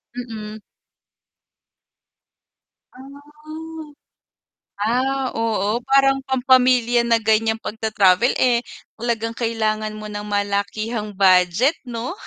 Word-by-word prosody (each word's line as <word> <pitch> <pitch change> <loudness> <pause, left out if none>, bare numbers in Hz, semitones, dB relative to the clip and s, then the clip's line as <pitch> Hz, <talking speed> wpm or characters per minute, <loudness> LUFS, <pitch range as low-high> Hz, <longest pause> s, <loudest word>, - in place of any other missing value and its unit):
Mm. 220 -3 -7 2.4
Ah. 275 +2 -13 1.6
Ah, 255 +5 0
oo, 225 -1 -1
parang 270 0 +4
pampamilya 250 -2 +3
na 235 0 +2
ganyan 220 0 +1
pagta-travel 220 -1 +1
eh, 245 -2 +3 0.4
talagang 230 -1 -2
kailangan 220 -2 -2
mo 215 - -9
ng 205 0 -6
malakihang 205 +1 -2
budget 190 - +4
'no? 235 +3 -4
225 Hz, 85 wpm, -21 LUFS, 215-245 Hz, 2.4 s, parang